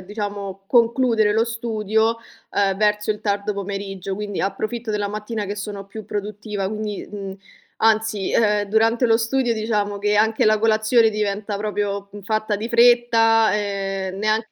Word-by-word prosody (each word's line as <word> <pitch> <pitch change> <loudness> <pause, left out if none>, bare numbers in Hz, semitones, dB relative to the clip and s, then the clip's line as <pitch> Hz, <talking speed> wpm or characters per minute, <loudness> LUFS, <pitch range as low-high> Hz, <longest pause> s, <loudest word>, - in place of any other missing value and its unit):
diciamo, 200 -1 -5
concludere 230 -3 +3
lo 225 +1 +2
studio, 225 -1 0 0.3
ehm, 195 -1 +1
verso 210 +1 +1
il 210 - -2
tardo 205 0 -1
pomeriggio; 195 -1 -4
quindi 205 0 -4
approfitto 215 +4 -3
della 205 -1 -1
mattina 210 0 -4
che 205 - -4
sono 200 -1 -6
più 215 +2 -9
produttiva, 205 -1 -4
quindi, 210 -1 -5
mhmm, 195 -2 -6 0.4
anzi, 220 -2 +1
ehm, 210 -2 +3
durante 225 +3 +2
lo 225 -2 +5
studio 240 +1 +1
diciamo 210 -2 -1
che 205 +1 +1
anche 220 +1 +3
la 215 0 +4
colazione 220 +1 +3
diventa 210 0 -2
proprio 205 -1 -2
fatta 215 +1 -1
di 220 +3 -4
fretta, 235 -2 +5
ehm, 195 -2 -3
neanche 215 +2 +1
210 Hz, 150 wpm, -22 LUFS, 200-225 Hz, 0.4 s, lo